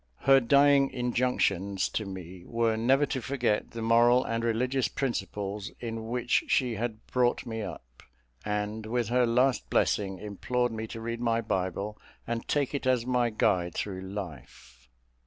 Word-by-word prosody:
Her 135 0 +6
dying 140 +2 +5
injunctions 110 -6 0
to 110 - -3
me 90 -2 -8
were 115 -1 +1
never 130 +6 +3
to 135 -2 -3
forget 120 -5 0
the 115 -1 -6
moral 120 +2 +5
and 115 0 -2
religious 125 +3 +1
principles 105 -5 -3
in 115 -2 -5
which 120 +1 +1
she 125 -3 +2
had 110 0 -4
brought 125 0 +1
me 110 -2 -4
up; 75 - -9 0.4
and, 105 +1 -3
with 120 -1 -1
her 125 0 +3
last 125 +3 +2
blessing, 95 -2 +1
implored 120 +5 -2
me 110 0 -4
to 115 - -7
read 115 +1 -4
my 115 -1 +1
Bible, 100 0 -2 0.3
and 115 0 -3
take 145 -2 0
it 140 -2 -2
as 125 -2 +2
my 125 -1 +2
guide 90 -5 +1
through 95 -2 -3
life. 85 -10 -9
115 Hz, 155 wpm, -28 LUFS, 105-125 Hz, 0.4 s, Her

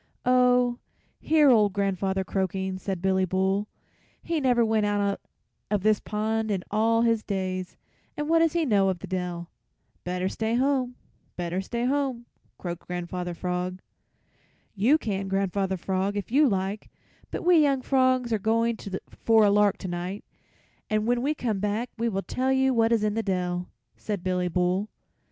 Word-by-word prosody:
"Oh, 250 -1 +3 0.4
hear 305 -3 +4
old 210 -4 +4
grandfather 195 -1 0
croaking!" 190 0 -2
said 190 -2 -4
Billy 190 0 +2
Bull; 190 +3 0 0.6
"he 330 -2 -1
never 245 -3 +3
went 220 -1 +1
out 205 -1 0 0.5
of 205 -2 0
this 215 -1 +3
pond 220 +1 -2
in 195 -3 -1
all 225 +2 +3
his 230 -2 +2
days, 185 -3 -3 0.4
and 295 0 -2
what 330 +1 +4
does 330 -1 +3
he 340 -2 +1
know 200 -6 +3
of 185 - -1
the - - -8
dell?" 180 -2 -4 0.5
"Better 180 +1 -2
stay 220 +3 -1
home, 255 -1 +1 0.4
better 175 +1 -2
stay 235 +5 -3
home," 265 -3 -1 0.3
croaked 175 -1 -6
Grandfather 175 0 -4
Frog. 180 +1 -3 0.9
"You 230 +9 +4
can, 195 -8 -3
Grandfather 195 0 0
Frog, 190 +3 -1
if 205 - -5
you 285 +2 +5
like, 195 +1 -2 0.4
but - - -5
we 355 -2 +6
young 275 -3 +2
frogs 255 -3 +2
are 220 - +1
going 230 +2 +1 0.3
for 225 -2 +3
a 200 - +4
lark 205 -1 +3
tonight, 180 +2 -5 0.6
and 215 0 +1
when 240 +1 +1
we 295 +4 0
come 225 -8 -2
back 210 +4 -2
we 235 0 +1
will 195 -2 -2
tell 260 +1 -1
you 265 0 +3
what 225 -1 +3
is 225 -2 +2
in 210 -1 +1
the 225 - 0
dell," 180 -3 -2 0.3
said 205 -4 -4
Billy 180 -1 0
Bull. 180 +4 0
205 Hz, 165 wpm, -26 LUFS, 190-240 Hz, 0.9 s, we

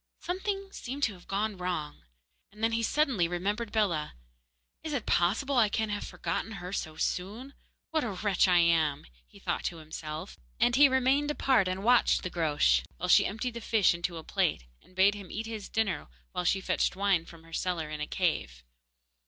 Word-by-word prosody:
Something 390 +2 -3
seemed 275 -1 -6
to 225 - +2
have 180 -2 -16
gone 205 +1 -1
wrong, 175 -5 -3 0.5
and 210 +2 -11
then 225 - +3
he 230 0 0
suddenly 245 - +2
remembered 205 +6 -2
Bellah. 180 -9 0 0.7
'Is - - -4
it - - -2
possible 225 +11 +1
I 220 -3 +5
can 220 +1 -1
have 205 0 -2
forgotten 225 - -3
her 180 -2 -7
so 155 -5 -3
soon? 205 - -3 0.4
What 315 -1 +1
a 235 - -2
wretch 195 0 +2
I 180 -1 +5
am!' 165 -4 +3 0.2
he - - -18
thought - - -3
to 170 - -2
himself; 155 - -7 0.2
and 240 0 +3
he 280 +1 +7
remained 265 +3 +2
apart 265 -9 +2
and 185 +1 -3
watched 245 +2 +4
the 185 - -4
Groac'h 145 - +2
while - - -3
she - - +6
emptied 225 +4 -3
the 235 - -6
fish 215 -5 +3
into 170 0 -3
a 160 - -7
plate, - - 0 0.2
and 185 - -23
bade 195 +2 +5
him 200 -3 -9
eat 225 - -4
his 220 -3 -6
dinner 215 -8 -1 0.2
while 180 - -3
she 195 +2 +2
fetched - - 0
wine 195 -3 +2
from 165 -1 -14
her 165 0 -16
cellar 165 -3 -2
in 150 0 -5
a 150 - -2
cave. 65 - -1
195 Hz, 195 wpm, -29 LUFS, 170-230 Hz, 0.7 s, he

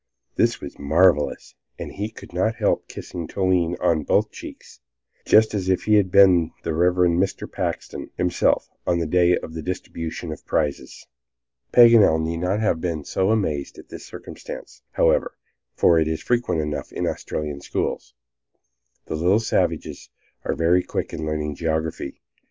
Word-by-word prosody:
This - - +2
was - - -9
marvelous, 75 +1 +2 0.2
and - - -6
he 105 +2 -4
could 110 - -13
not 110 +6 0
help - - 0
kissing 85 -3 -7
Toline 90 -3 +1
on 85 -3 +2
both - - +1
cheeks, - - -11 0.5
just 110 0 +5
as 95 -3 -2
if 95 - +1
he 110 - +2
had 100 -3 +4
been 90 -4 +5
the 80 - -2
Reverend 90 +1 +3
Mr. 95 - -2
Paxton - - -4
himself, 90 0 +1 0.2
on 90 - +2
the 85 - -1
day 90 +2 +3
of 80 - -8
the 80 - -5
distribution 85 -1 -5
of 75 - -8
prizes. 75 -3 -2 0.7
Paganel 115 -9 +7
need 80 +1 -2
not 90 +4 -1
have 105 -7 0
been 85 -4 -2
so 95 +1 0
amazed 80 -11 -1
at - - -13
this - - -9
circumstance, - - -10
however, - - +2 0.4
for 85 -1 +4
it 80 - +1
is 80 0 -2
frequent 120 -5 0
enough 75 -1 -4
in - - -3
Australian 75 -2 -4
schools. 60 -2 -3 0.9
The - - -5
little 90 +7 +2
savages 115 - -1 0.3
are - - -2
very 85 +2 +3
quick - - -4
in 80 - -4
learning 75 -1 -2
geography. 80 -3 -3
85 Hz, 160 wpm, -23 LUFS, 80-95 Hz, 0.9 s, Paganel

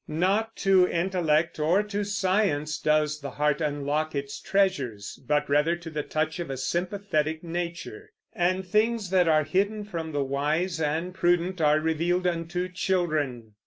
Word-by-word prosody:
Not 195 +8 0
to 190 -2 +5
intellect 170 -3 0
or 170 +7 +3
to 205 0 -3
science 185 -7 0
does 150 0 +1
the 140 - -5
heart 150 +2 0
unlock 150 +1 -1
its 140 0 -4
treasures, 135 - -1
but 150 0 +1
rather 150 +4 +2
to 170 -1 -9
the 150 -1 -2
touch 155 +3 -2
of 170 - -4
a 135 - -4
sympathetic 170 +1 -1
nature; 175 - -5 0.2
and 185 -1 0
things 215 +1 +1
that 180 -2 +4
are 155 -1 +4
hidden 205 +6 0
from 165 -6 -5
the 145 -2 0
wise 155 +6 -1
and 160 +4 -1
prudent 175 0 +1
are 150 0 +4
revealed 165 +3 0
unto 175 +1 -1
children. 155 - -1
170 Hz, 155 wpm, -26 LUFS, 150-185 Hz, 0.2 s, to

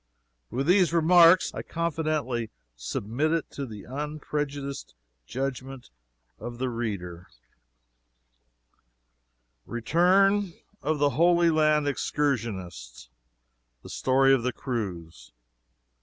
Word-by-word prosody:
With 130 +4 -2
these 180 0 +4
remarks 170 +2 +5
I - - -5
confidently 155 -8 -2 0.3
submit 115 - -2
it 165 -2 -2
to 140 -2 -5
the 105 -3 -9
unprejudiced 145 - -5 0.3
judgment 135 - -5 0.5
of 120 0 -7
the 130 +1 -2
reader: 95 -7 -5 2.4
RETURN 185 - +2 0.3
OF 155 +1 -1
THE 145 0 +2
HOLY 170 +4 +3
LAND 155 -1 +2
EXCURSIONISTS 95 - -3 0.7
THE - - -11
STORY 135 +1 +3
OF 135 - +2
THE 125 +1 -2
CRUISE. 85 - -6
135 Hz, 95 wpm, -26 LUFS, 115-155 Hz, 2.4 s, remarks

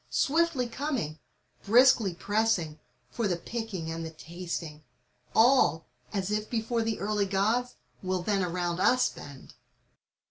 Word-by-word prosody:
Swiftly 310 -4 +1
coming, 235 - -3 0.4
briskly 230 -4 +5
pressing, 195 -6 0 0.3
for 230 -3 -1
the 175 -3 0
picking 195 -5 -5
and 165 0 -4
the 160 - -5
tasting: 165 -2 -7 0.5
All, 225 -9 +4 0.3
as 195 -1 -2
if 210 0 -1
before 230 0 -1
the 225 -1 -2
early 205 0 0
Gk>ds, 220 +6 0 0.3
will 185 -1 -2
then 200 0 +1
around 175 0 -2
us 250 +6 +4
bend. 140 -2 -12
205 Hz, 130 wpm, -28 LUFS, 170-235 Hz, 0.5 s, briskly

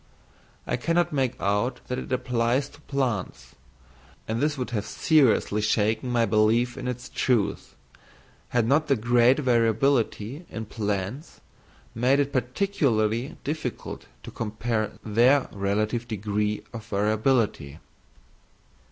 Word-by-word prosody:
I 120 - -1
cannot 170 +5 +1
make 130 -3 0
out 105 +6 0
that 125 - -2
it - - -8
applies 125 +2 0
to 145 +1 -18
plants, 115 - -3 0.7
and 115 +2 -2
this 150 0 +1
would 125 -1 -4
have 105 -3 -2
seriously 130 -8 +3
shaken 110 +2 +1
my 120 -1 +3
belief 115 +3 +2
in 130 -2 -5
its 125 -1 -4
truth, 120 -6 -1 0.7
had 120 -2 +1
not 150 +4 +3
the 140 - +3
great 120 +2 +4
variability 120 - +1
in 110 0 -5
plants 105 - -4 0.5
made 125 +5 +2
it 140 0 0
particularly 125 - 0
difficult 150 -4 -5 0.2
to - - -8
compare 110 0 -2
their 120 +6 +4
relative 105 +4 -1
degrees 105 -1 -2
of 115 -2 -6
variability. 105 - 0
120 Hz, 120 wpm, -26 LUFS, 110-130 Hz, 0.7 s, great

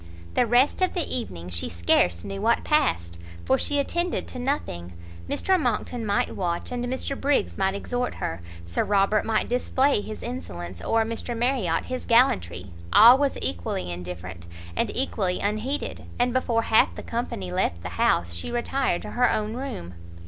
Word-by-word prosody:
The 245 - +3
rest 250 - +3
of 370 - +2
the 345 -4 0
evening 90 - -5
she 85 -1 -2
scarce 85 +1 +2
knew 195 0 -5
what 230 +2 +2
passed, 85 - +1 0.3
for 130 - +3
she 290 - +1
attended 345 +5 -1
to 255 - -7
nothing; 90 - -3 0.4
Mr 380 -1 +2
Monckton 240 -2 -1
might 200 - 0
watch, 175 +1 -2
and 245 -1 -2
Mr 260 +2 -3
Briggs 280 +1 +1
might 190 0 0
exhort 245 +4 -2
her, 80 +1 -4 0.2
Sir 85 0 0
Robert 205 +1 +2
might 220 -1 +1
display 260 0 +2
his 215 +1 -7
insolence, 90 - -6
or 225 0 +2
Mr 230 +1 -3
Marriot 230 -9 +1
his 255 0 -5
gallantry, 90 - +2 0.2
all 240 +5 +9
was 285 -1 +1
equally 90 0 -2
indifferent, 85 -1 -7 0.3
and - - +1
equally 200 -8 0
unheeded; 215 +8 -2
and 245 0 +1
before 235 -3 +1
half 220 - +4
the - - -7
company 100 - -4
left 85 -1 -1
the 90 - -4
house, 85 0 +1
she 85 - -4
retired 240 -4 0
to - - -7
her 245 0 +3
own 215 0 -1
room. 245 - -5
215 Hz, 170 wpm, -25 LUFS, -, 0.4 s, all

